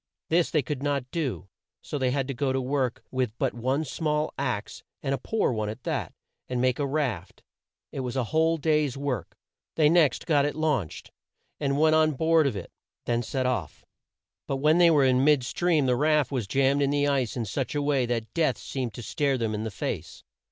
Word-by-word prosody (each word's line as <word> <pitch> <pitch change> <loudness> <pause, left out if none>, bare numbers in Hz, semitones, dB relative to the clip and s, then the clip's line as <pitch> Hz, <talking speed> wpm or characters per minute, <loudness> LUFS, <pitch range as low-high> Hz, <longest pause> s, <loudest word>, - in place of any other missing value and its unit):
This 170 +1 +3
they 155 -3 +1
could 140 0 -4
not 140 -3 -2
do, 125 - -3 0.4
so 145 - -4
they 130 -1 +1
had 135 0 -1
to 135 - -3
go 135 +2 -1
to 130 - 0
work 130 -1 -1
with 125 -4 -2
but - - 0
one 130 +6 -1
small 150 +1 -1
axe, 125 -7 -3 0.2
and 135 - 0
a 135 - -2
poor 220 - 0
one 110 -3 -2
at 110 +4 -8
that, 135 - -2 0.4
and 125 -1 -1
make 130 +1 +1
a 145 - 0
raft. 130 - -3 0.5
It - - -5
was 125 -1 -3
a 130 - +1
whole 160 +1 +3
day's 150 -3 +1
work. 140 -3 -4 0.4
They 155 -2 +4
next 160 -6 +3
got 145 -3 +3
it 145 - -1
launched, 150 - -2 0.5
and 140 -1 0
went 155 0 +4
on 155 -1 +4
board 160 +1 +3
of 125 - -2
it; 95 - -7 0.3
then 120 0 +1
set 130 +3 -2
off. 110 - -3 0.6
But 135 - -1
when 155 +5 +3
they 175 -1 +7
were 145 -4 +4
in 130 0 +3
mid 145 -3 +4
stream 155 +4 +1
the 125 -1 +2
raft 150 +1 +2
was 125 -7 -2
jammed 135 +5 +2
in 140 - +2
the 145 0 +1
ice 130 -4 0
in 115 - -1
such 130 +8 -3
a 145 - +1
way 140 -4 +1
that 115 -2 -3
death 155 -8 +1
seemed 125 -5 -4
to 120 - -7
stare 140 +2 0
them 115 -3 -1
in 105 +1 -3
the - - -2
face. 95 - -5
135 Hz, 215 wpm, -27 LUFS, 125-150 Hz, 0.6 s, they